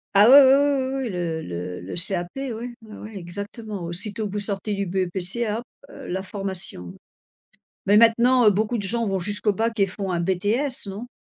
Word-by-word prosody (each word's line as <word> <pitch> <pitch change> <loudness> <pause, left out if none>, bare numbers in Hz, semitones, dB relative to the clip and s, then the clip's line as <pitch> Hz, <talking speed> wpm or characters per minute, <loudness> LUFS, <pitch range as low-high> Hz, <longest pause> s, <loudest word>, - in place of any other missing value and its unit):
Ah, 205 +3 +7
ouais, 280 +2 +10
ouais, 265 0 +6
ouais 280 -2 +2
oui, 270 0 -2
oui, - - -3
le 170 -4 -3
le 90 - -6
le 90 - -7
CAP, 175 0 0
oui. 270 -1 -4 0.3
Oui, 215 -1 -12
oui, 215 0 -10
exactement. 200 +3 -6
Aussitôt 205 +5 -2
que 195 - -8
vous - - -2
sortez 205 0 -2
du 200 0 -2
BEPC, 190 +5 0
hop, 225 +3 -3 0.2
heu, - - -11
la 190 +1 -3
formation, 190 - -5 0.9
mais 205 +1 +5
maintenant, 235 +2 +5
heu, - - +8
beaucoup 215 +4 -1
de 205 - -4
gens 230 +4 -1
vont 195 -1 0
jusqu'au 205 +3 0
Bac 225 +2 -2
et 195 - +5
font 195 0 -4
un 170 - -1
BTS 205 +10 0
non? 205 +5 -7
205 Hz, 205 wpm, -23 LUFS, 185-230 Hz, 0.9 s, ouais